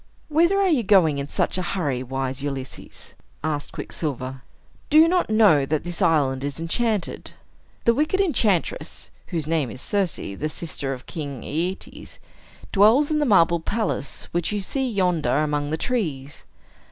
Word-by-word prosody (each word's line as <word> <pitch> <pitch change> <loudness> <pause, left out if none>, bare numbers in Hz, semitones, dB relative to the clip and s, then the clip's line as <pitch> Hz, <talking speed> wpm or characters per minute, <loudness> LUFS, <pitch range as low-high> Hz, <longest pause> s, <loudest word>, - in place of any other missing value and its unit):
"Whither 340 +6 +3
are 395 - +3
you 305 -9 +3
going 185 -9 +4
in 140 - -4
such 185 - -1
a 180 - -3
hurry, 140 -8 -1
wise 130 +1 -3
Ulysses?" 135 -2 -7 0.3
asked 150 -2 -2
Quicksilver. 130 -4 -5 0.5
"Do 305 - +4
you 320 +1 +8
not 360 -5 +1
know 210 -10 +5
that 150 +2 -1
this 175 +3 -4
island 145 -6 +2
is 140 +1 -4
enchanted? 205 +4 -1 0.5
The 235 - +5
wicked 305 +9 +1
enchantress 225 - 0 0.2
(whose 165 -4 -2
name 155 -5 0
is 120 - -8
Circe, 195 +3 0
the 100 +11 -4
sister 150 -4 -5
of 130 -1 -6
King 140 -6 -6
Aetes) 190 - -4 0.5
dwells 225 +9 +5
in 305 - +2
the 295 - +1
marble 170 -5 +4
palace 205 -6 -3
which 175 +2 -1
you 210 - -1
see 260 +7 -2
yonder 180 - +1
among 145 -1 -1
the 160 - -1
trees. 155 - -3
170 Hz, 160 wpm, -23 LUFS, 145-220 Hz, 0.5 s, you